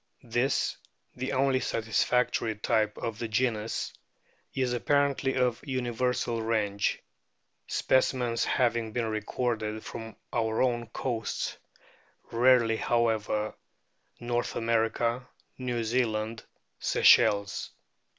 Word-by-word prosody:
This 120 +3 0 0.4
the 130 +1 -3
only 135 0 +3
satisfactory 115 0 +1
type 105 0 0
of 115 -1 -4
the 115 - -2
genus 110 -1 -1 0.6
is 130 -2 0
apparently 140 +1 +1
of 125 -2 +1
universal 125 -2 -1
range, 105 -3 0 0.7
specimens 125 -3 +1
having 120 -3 +1
been 120 0 0
recorded 110 0 -2
from 115 -1 -7 0.2
our 110 -1 0
own 120 -2 0
coasts 115 0 -3 0.8
(rarely, 115 -1 +4
how 120 0 +2
ever), 110 -1 -1 0.7
North 120 0 -2
America, 115 +2 0 0.3
New 125 -2 -2
Zealand, 110 -1 -1 0.3
Seychelles. 100 0 +4
115 Hz, 95 wpm, -29 LUFS, 110-125 Hz, 0.8 s, rarely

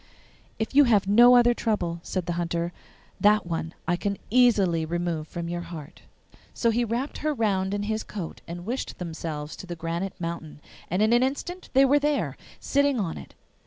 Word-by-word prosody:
'If 220 +3 -3
you 285 +1 +7
have 215 -6 +3
no 240 +5 +7
other 240 0 +6
trouble,' 180 -8 -1
said 185 0 -3
the 175 - -2
Hunter, 170 0 -2 0.5
'that 210 -1 +4
one 165 0 -4
I 175 - +2
can 200 +2 -2
easily 205 -9 +4
remove 165 -1 -2
from 170 +1 -5
your 175 0 -3
heart.' 165 -4 -9 0.5
So 230 - +2
he 240 +2 +1
wrapped 240 +5 -3
her 305 -1 -1
round 195 -5 0
in 205 0 -1
his 220 +1 -1
cloak 190 -6 -7
and 175 +1 -7
wished 245 +5 -4
themselves 160 -3 -5
to 185 - -9
the 175 - -5
granite 170 +3 -4
mountain, 165 -3 -5 0.3
and 185 +5 +1
in 220 +2 +3
an 240 - +5
instant 285 +8 -3
there 275 +2 +5
they 295 0 +1
were, - - -3 0.2
sitting 280 -2 +1
on 180 -6 -2
it! - - -13
195 Hz, 190 wpm, -26 LUFS, 170-240 Hz, 0.5 s, you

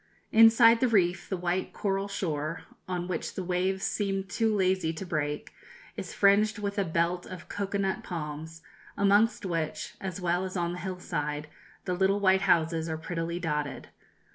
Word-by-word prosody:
Inside 230 +1 +7
the 255 - +3
reef 180 -5 +2
the 190 - -1
white 180 +1 -2
coral 195 -1 -1
shore, 165 -5 -3 0.2
on 180 -1 -3
which 175 -3 -3
the 190 - -3
waves 185 +2 0
seemed 195 -2 -1
too 225 +2 +1
lazy 185 -4 +1
to 165 +4 -6
break, 150 -3 -3 0.4
is - - -6
fringed 210 +2 +4
with 200 0 -3
a - - +3
belt 170 +1 0
of 180 -2 -9
cocoa 200 0 -3
nut 195 -1 -1
palms, 160 -1 -6 0.3
amongst 205 +3 +3
which, 165 -4 -3
as 190 0 -4
well 180 0 0
as 185 0 -4
on 170 -1 0
the 180 - -6
hillside, 150 -6 -4 0.4
the 180 - -1
little 190 +2 +2
white 190 -1 +4
houses 165 -1 +2
are 160 - -2
prettily 170 +1 -3
dotted. 150 -4 -3
185 Hz, 165 wpm, -28 LUFS, 165-200 Hz, 0.4 s, Inside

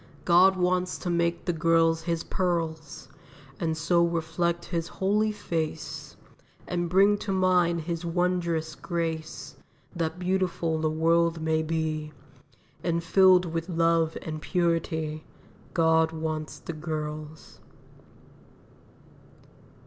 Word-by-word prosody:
God 185 +2 +5
wants 180 0 0
to 175 - -3
make 170 0 0
the 175 - 0
girls 165 0 +3
His 165 0 -2
pearls, 165 -4 -2 0.5
And 160 -2 -1
so 170 +1 +3
reflect 170 +1 -1
His 170 -1 -2
holy 210 +3 +1
face, 160 -6 -4 0.5
And 175 -1 -2
bring 200 +3 +4
to 200 - -4
mind 180 -3 +2
His 170 +1 -4
wondrous 170 -2 0
grace, 165 -1 -4 0.4
That 165 0 -2
beautiful 180 -3 0
the 155 - +1
world 165 +1 +2
may 160 0 +1
be, 155 -1 -2 0.7
And 170 -1 0
filled 185 +1 +5
with 165 +1 -4
love 165 -1 +2
and 155 -1 -5
purity. 160 -2 -1 0.5
God 160 -1 +3
wants 155 -1 -4
the 170 - -7
girls." 155 -1 -6
165 Hz, 110 wpm, -27 LUFS, 160-175 Hz, 0.7 s, God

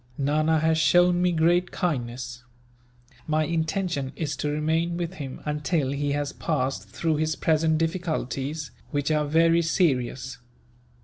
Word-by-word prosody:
Nana 155 +3 +2
has 160 +1 +2
shown 175 +2 +4
me 180 0 +3
great 175 +2 +2
kindness. 125 -6 -3 0.8
My 155 0 +2
intention 160 -3 -1
is 155 -3 -2
to 150 - -1
remain 160 +3 0
with 175 0 -3
him, 135 -2 -6
until 150 -1 0
he 140 0 -1
has 145 0 -2
passed 135 -4 -2
through 160 -2 -1
his 155 0 0
present 160 0 +2
difficulties, 155 -4 -2 0.2
which 145 +1 -1
are 150 -1 +2
very 165 +2 +4
serious. 135 -7 0
155 Hz, 135 wpm, -25 LUFS, 145-165 Hz, 0.8 s, shown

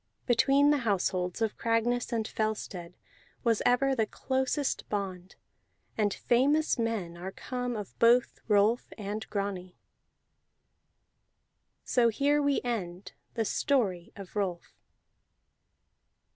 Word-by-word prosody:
Between 275 +4 +4
the 295 - +3
households 185 -3 0
of 220 - -2
Cragness 235 +2 0
and 225 -2 -1
Fellstead 195 -5 -3 0.5
was 230 -3 +2
ever 270 +2 +3
the 220 -3 +1
closest 265 +4 -1
bond, 190 -3 -4 0.6
and 210 -2 +1
famous 275 +8 +2
men 220 -7 -2
are 180 +2 -6
come 245 +3 -4
of 210 -3 -7
both 240 +2 +4
Rolf 210 +2 +2
and 210 +1 -5
Grani. 195 -3 -4 2.1
So 240 -2 +3
here 285 +6 +2
we 285 -1 +1
end 185 -6 -4 0.2
the 225 -2 0
Story 200 -10 0
of 195 -1 -11
Rolf. 185 -4 -3
220 Hz, 110 wpm, -29 LUFS, 195-245 Hz, 2.1 s, Between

